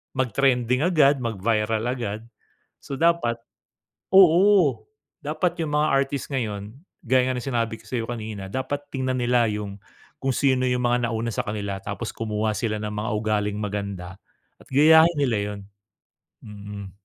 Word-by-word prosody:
mag-trending 130 - +1
agad, 150 -5 +4
mag-viral 110 -1 -1
agad. 110 -4 -3 0.6
So - - -9
dapat, 160 -7 +1 0.7
oo. 185 -3 +6 0.4
Dapat 175 -1 -2
yung 150 -2 -2
mga 150 +1 +3
artist 135 +1 0
ngayon 105 -6 -3 0.3
gaya 130 +1 +3
nga 130 - -1
ng 125 - -5
sinabi 115 -4 -1
ko - - -20
sa'yo 115 -3 -3
kanina, 110 -4 -5
dapat 140 +5 -4
tingnan 130 -1 -2
nila 120 0 +3
yung 105 -1 -5 0.5
kung 135 - +1
sino 130 -2 +2
yung 125 0 0
mga 120 0 +1
nauna 115 +1 -2
sa - - 0
kanila 100 -2 -3
tapos 105 +3 -5
kumuha 110 -1 -2
sila 110 -3 -2
ng 105 - -3
mga 105 +2 -3
ugaling 105 -1 -1
maganda 100 -3 -5 0.4
at - - -20
gayahin 160 +4 +6
nila 125 -6 +1 0.2
yun. 100 - -8 0.9
Mm. 100 -1 -9
120 Hz, 150 wpm, -24 LUFS, 105-135 Hz, 0.9 s, oo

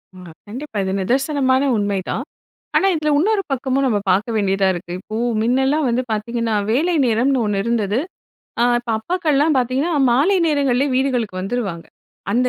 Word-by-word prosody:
ஆ - - -12 0.3
கண்டிப்பா, 245 +1 -7
இது 190 - -2
நிதர்சனமான 265 +3 +1
உண்மைதான். 205 +4 -2 0.5
ஆனா 390 - +4
இதில, 305 -1 0
இன்னொரு 405 +3 +1
பக்கமும் 270 +1 0
நம்ம 210 -4 +1
பார்க்க 220 +5 0
வேண்டியதா 195 -2 +1
இருக்கு. 175 0 -7
இப்போ 215 +3 -8 0.3
மின்னலாம் 265 +5 +1
வந்து 240 +2 +1
பார்த்தீங்கன்னா, 225 +1 -1 0.2
வேலை 330 +8 +1
நேரம்னு 245 +2 +2
ஒண்ணு 200 -1 0
இருந்தது. 225 -1 0 0.6
அ - - +4 0.2
இப்ப 240 -1 -6
அப்பாக்கள்லாம் 305 0 +1
பார்த்தீங்கன்னா, 260 +7 0 0.2
மாலை 305 +11 +3
நேரங்கள்லேயே 280 -2 +1
வீடுகளுக்கு 250 -8 -1
வந்துருவாங்க. 195 -5 -4 0.5
அந்த 250 +3 +2
250 Hz, 145 wpm, -19 LUFS, 215-275 Hz, 0.6 s, ஆனா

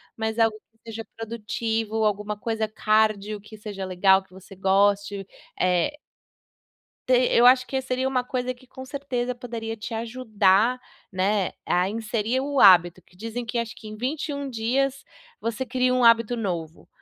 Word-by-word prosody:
mas 220 0 -3
algo 225 -1 +3
que 225 +1 -41
seja 225 0 -6
produtivo 225 -1 -2
alguma 210 0 -1
coisa 220 0 -2
cárdio 215 -1 +1
que 215 +1 -13
seja 205 -2 -7
legal 190 +1 +4
que - - -30
você 190 +1 -13
goste, 200 +1 +1 0.3
eh 185 +11 +1 1.1
Te 255 - +4 0.2
eu 240 - +6
acho 255 0 +6
que 265 -1 -1
seria 260 0 -1
uma 255 -2 0
coisa 255 0 -2
que, 255 +1 -20
com 260 +1 -10
certeza, 260 -3 -3
poderia 230 -2 -6
te 220 +2 -6
ajudar, 225 0 +2 0.3
né, 195 +1 0
a 180 +1 +1
inserir 225 +3 -1
o 280 +1 -2
hábito 175 -2 +7
que 180 - -26
dizem 230 +4 -5
que, 235 +1 -2
acho 230 -1 -3
que 220 - -12
em 215 - -8
21 280 +3 -3
dias, 260 +4 -1 0.4
você 230 +3 -2
cria 255 0 +1
um 255 - +2
hábito 230 0 +5
novo. 170 -7 -4
225 Hz, 160 wpm, -25 LUFS, 205-250 Hz, 1.1 s, hábito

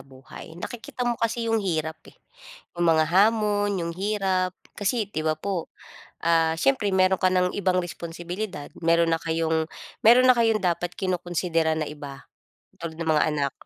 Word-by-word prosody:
buhay, 135 +4 -12
nakikita 240 +5 -6
mo 240 - +1
kasi 230 0 0
'yong 225 -1 +1
hirap, 160 -4 -2
eh, - - -17 0.6
'yong 175 0 0
mga 160 -1 +4
hamon, 205 0 +3
'yong 170 -2 -3
hirap. 190 -1 -1 0.2
Kasi, 215 +3 -1
'di - - -2
ba, 155 0 0
po, 180 +1 -3 0.5
ah, 165 -1 +3
siyempre 245 -7 +2
meron 185 0 +4
ka 185 - +3
ng 180 0 +1
ibang 185 -2 +1
responsibilidad, 175 0 -6 0.2
meron 170 0 +4
na 165 - -5
kayong 160 -1 0 0.3
meron 245 +3 +7
na 255 - +7
kayong 225 -2 +3
dapat 175 -2 -1
kinokonsidera 175 -3 0
na 155 - -2
iba, 145 -2 -9 0.5
tulad 165 -1 -6
ng 165 0 -1
mga 150 -1 +4
anak. 140 -2 0
175 Hz, 165 wpm, -25 LUFS, 160-205 Hz, 0.6 s, meron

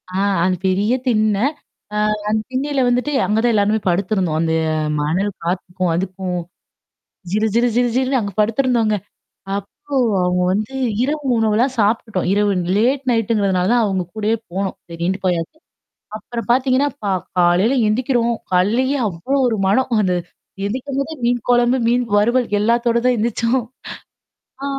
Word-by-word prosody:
ஆ 185 - -8 0.3
அது 185 +1 +2
பெரிய 200 +5 +1
திண்ண. 215 -3 +2 0.6
அ - - -2 0.3
அந்த 215 +1 +1
திண்ணயில 275 +2 -1
வந்துட்டு 250 +4 0
அங்க 215 +1 +1
தான் 240 0 +3
எல்லாருமே 210 +1 +2
படுத்திருந்தோம். 180 -3 0
அந்த 165 -1 0 0.5
மணல் 185 +7 0
காத்துக்கும் 180 0 -2
அதுக்கும். 185 0 -3 0.9
ஜீர, 210 +3 +1
ஜீர, 235 +1 +3
ஜீர, 245 +1 +3
ஜீல்ன்னு 260 0 +1
அங்க 200 -2 -4
படுத்துருந்தோங்க. 230 -1 +2 0.6
அப்போ 235 +8 -6 0.3
அவங்க 180 0 +1
வந்து 215 +6 -2 0.3
இரவு 295 +3 -2
உணவுலாம் 225 +4 +1
சாப்ட்டுட்டோம். 210 -3 0
இரவு 205 0 +2 0.3
லேட் 260 +5 +2
நைட்ங்கிறதுனால 200 -4 +1
அவங்க 195 -3 0
கூடயே 215 +1 0 0.2
போனோம். 190 +1 -2 0.2
சரின்ட்டு 175 +3 -2
போயாச்சு. 175 - -1 0.6
அப்புறம் 230 +2 -6
பாத்தீங்கன்னா, 260 +3 +3
ப - - -4 0.3
காலையில 180 +8 +3
எந்திக்கிறோம். 235 +1 +1 0.2
காலலேயே 235 +10 +2
அவ்ளோ 190 +10 -2
ஒரு 230 -3 +1
மனம். 215 +7 +2
அந்த 185 -2 +1 0.5
எந்திக்கும்போதே 275 +7 -3
மீன் 245 0 +1
கொழம்பு, 245 +1 +3
மீன் 245 +1 +2
வறுவல், 240 +4 +2
எல்லாத்தோட 235 +2 +2
தான் 250 -1 +3
எந்திரிச்சோம். 230 +2 0 1.0
ஆ - - -2
220 Hz, 135 wpm, -19 LUFS, 190-245 Hz, 1.0 s, தான்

